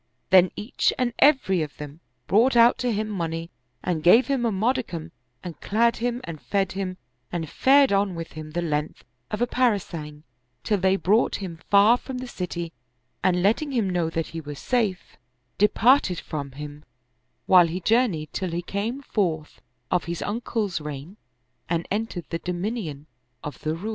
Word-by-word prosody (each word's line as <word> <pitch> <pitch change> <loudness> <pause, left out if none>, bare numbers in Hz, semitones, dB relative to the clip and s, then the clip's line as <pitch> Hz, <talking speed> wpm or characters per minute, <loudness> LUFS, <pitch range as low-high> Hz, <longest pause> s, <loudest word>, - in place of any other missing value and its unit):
Then 185 -1 +7
each 220 +5 0
and 245 -2 0
every 265 - +4
of 150 -2 -5
them 150 +1 -9 0.3
brought 235 +6 +3
out 235 0 +6
to 250 -1 0
him 215 0 -1
money 165 -4 -4 0.3
and 170 -3 -1
gave 205 +10 +6
him 265 -4 0
a - - 0
modicum 195 -6 -1 0.3
and 175 -3 -8
clad 235 +3 +2
him 245 +1 -2
and 165 -3 -7
fed 195 -2 0
him 190 -1 -4 0.3
and 165 -2 -3
fared 270 - +4
on 195 -2 +1
with 165 -1 -6
him 155 0 -8
the 175 +1 -1
length 150 -2 -2 0.3
of 210 +2 -1
a - - +4
parasang, 175 -12 -1 0.4
till 210 -2 +1
they 190 +1 +3
brought 210 +4 +2
him 180 -4 -6
far 205 +4 +6
from 260 0 -7
the 255 - -5
city, 175 -7 -5 0.5
and 180 -1 +2
letting 270 +8 +1
him 230 -6 +1
know 175 -3 0
that 165 0 -3
he 165 0 -6
was 145 -1 -8
safe, 220 - -1 0.4
de 210 - +6
parted 230 -6 +3
from 140 -4 -6
him, 150 +1 -8 0.6
while 180 -2 +6
he 170 +3 -3
journeyed 195 -7 +1
till 185 -1 -2
he 170 +1 -3
came 220 +9 -3
forth 165 - -2 0.3
of 180 - +1
his 170 0 -4
uncle's 210 -4 -2
reign 150 +4 -7 0.5
and 170 0 -1
entered 205 -4 -2
the 165 - -2
dominion 180 - -4 0.4
of 150 - -7
the 155 +1 -1
Roum. 195 +7 -5
185 Hz, 175 wpm, -25 LUFS, 165-225 Hz, 0.6 s, Then